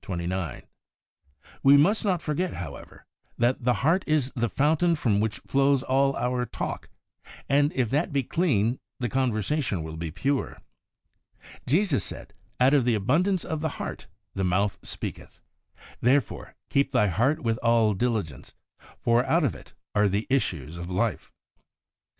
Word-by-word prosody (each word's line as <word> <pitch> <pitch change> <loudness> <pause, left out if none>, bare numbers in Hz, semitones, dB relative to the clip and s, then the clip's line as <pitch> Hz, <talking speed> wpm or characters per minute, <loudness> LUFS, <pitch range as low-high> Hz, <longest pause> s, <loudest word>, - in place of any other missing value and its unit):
We 140 +1 +7
must 195 +10 +3
not 185 -6 0
forget, 165 +4 -1
how 85 -6 -6
ever, - - -14 0.3
that 120 +1 +1
the 125 0 +3
heart 175 +5 +3
is 150 -4 +1
the 120 -1 0
fountain 160 +6 +2
from 115 -9 +1
which 105 -3 -1
flows 135 -1 +2
all 135 +1 +2
our 125 0 -1
talk, - - -5 0.6
and 145 +2 +3
if 125 -4 0
that 155 +6 0
be 140 -2 +1
clean 125 - +1 0.2
the 120 -2 -1
conversation 120 - -1
will 80 0 -7
be 80 0 -4
pure. 130 - -2 1.1
Jesus 150 - +2
said, 100 - -8
' 110 - -40
Out 130 +3 +5
of 140 -3 +4
the 120 -1 +2
abundance 170 - +1
of 160 -2 -3
the 160 -2 -3
heart - - -6 0.3
the 95 - -2
mouth 95 +3 +1
speaketh.' - - -7 0.6
Therefore, 125 -3 0
' - - -52
keep 140 -1 +2
thy 125 -5 +3
heart 120 - +1
with 115 -1 0
all 115 -2 +3
diligence, 100 - -3 0.4
for 120 +1 +2
out 165 +1 +2
of 130 - +1
it 70 - -14 0.2
are 105 0 +3
the 100 +3 -1
issues 85 - -1
of 85 +1 -6
life. 105 +5 -1
125 Hz, 155 wpm, -26 LUFS, 105-145 Hz, 1.1 s, We